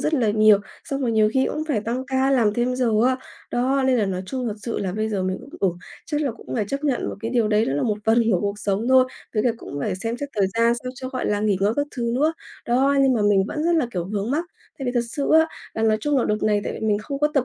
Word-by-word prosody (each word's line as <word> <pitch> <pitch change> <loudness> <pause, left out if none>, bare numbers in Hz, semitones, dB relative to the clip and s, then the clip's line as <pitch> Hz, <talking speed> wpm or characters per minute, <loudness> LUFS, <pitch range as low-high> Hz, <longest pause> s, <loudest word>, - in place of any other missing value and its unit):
rất 315 - 0
là 235 -7 +2
nhiều, 215 -1 +6 0.3
xong 275 0 -3
rồi 240 -4 0
nhiều 215 -1 +4
khi 265 0 +3
cũng 305 - -2
phải 230 -8 +1
tăng 240 +4 -3
ca, 265 0 +1
làm 230 -6 +3
thêm 245 +1 0
giờ 250 -2 +1 0.2
á. 260 - +2 0.3
Đó, 265 +3 +1
nên 255 -2 +3
là 205 - +1
nói 185 -1 -3
chung 255 +3 -3
thật 210 - -3
sự 235 - -3
là 190 -2 -2
bây 215 +2 -1
giờ 200 -3 -1
mình 185 0 -2
cũng, - - -13
ừ, 195 - +3 0.4
chắc 295 -1 -1
là 280 -4 0
cũng 230 - -9
phải 220 - 0
chấp 280 +2 -3
nhận 270 -4 0
một - - -4
cái 225 0 -3
điều 235 -4 +2
đấy, 215 +1 +3
đó - - -1
là 145 - 0
một 210 -2 0
phần 225 +2 +4
của 180 - +2
cuộc 205 0 -2
sống 205 +3 -1
thôi, 260 0 +6 0.3
với 215 - +2
cả 245 - +3
cũng 145 - -8
phải - - -1
xem 225 +5 -3
xét 285 +3 -5
thời 195 - +3
gian 230 +1 +3
sao 255 - -4
cho, 260 -1 -6
gọi 255 -1 -3
là, 205 0 0
nghỉ 210 -2 +2
ngơi 205 +2 +3
các 290 0 +1
thứ 235 -1 -1
nữa. 300 +5 +2 0.3
Đó, 270 +4 +3
nhưng 270 -1 +4
mà 230 - 0
mình 205 -2 +4
vẫn 300 - -3
rất 340 - +3
là, 310 -7 +2
kiểu, 175 -6 -3
vướng 205 +3 -2
mắc. 315 +5 0 0.3
Tại 270 - -4
vì 245 - 0
thật 240 -1 +1
sự 280 +4 -2
á, 320 0 +6 0.3
là 220 - -2
nói 220 -1 +3
chung 295 +4 +1
là - - +1
đợt 210 0 -1
này 210 -1 +2
tại - - -3
vì 220 - -4
mình 205 -1 +2
không 275 +6 -5
có 300 - +3
tập 275 -3 +3
235 Hz, 310 wpm, -23 LUFS, 210-265 Hz, 0.4 s, nhiều